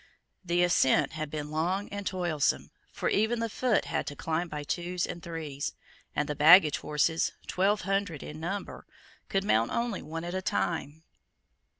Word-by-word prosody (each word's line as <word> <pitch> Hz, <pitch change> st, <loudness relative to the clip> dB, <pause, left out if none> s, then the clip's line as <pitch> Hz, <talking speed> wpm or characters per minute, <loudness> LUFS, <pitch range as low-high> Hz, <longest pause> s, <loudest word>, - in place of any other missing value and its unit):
The 175 Hz, 0 st, +2 dB
ascent 175 Hz, -7 st, +3 dB
had 155 Hz, 0 st, -4 dB
been 150 Hz, 0 st, -5 dB
long 180 Hz, +6 st, 0 dB
and 200 Hz, -1 st, -5 dB
toilsome: 175 Hz, -6 st, 0 dB, 0.2 s
for -, -, -3 dB
even 220 Hz, +3 st, +2 dB
the 230 Hz, 0 st, -1 dB
foot 245 Hz, -2 st, +1 dB
had -, -, -2 dB
to 145 Hz, -, -4 dB
climb 165 Hz, +4 st, -2 dB
by 150 Hz, -1 st, -5 dB
twos 175 Hz, +3 st, -2 dB
and 170 Hz, -, -6 dB
threes; 155 Hz, -4 st, -4 dB, 0.4 s
and 150 Hz, -, 0 dB
the 150 Hz, -, -1 dB
baggage 155 Hz, +1 st, +7 dB
horses, 150 Hz, +2 st, +1 dB
twelve 200 Hz, +3 st, +1 dB
hundred 195 Hz, -5 st, -1 dB
in 150 Hz, +1 st, -8 dB
number, 190 Hz, +5 st, -5 dB, 0.4 s
could 195 Hz, 0 st, +1 dB
mount 115 Hz, -, +2 dB
only 235 Hz, -4 st, -1 dB
one 165 Hz, +2 st, -6 dB
at 175 Hz, +1 st, -4 dB
a 185 Hz, -, -1 dB
time. 160 Hz, -4 st, -2 dB
170 Hz, 170 wpm, -29 LUFS, 150-195 Hz, 0.4 s, baggage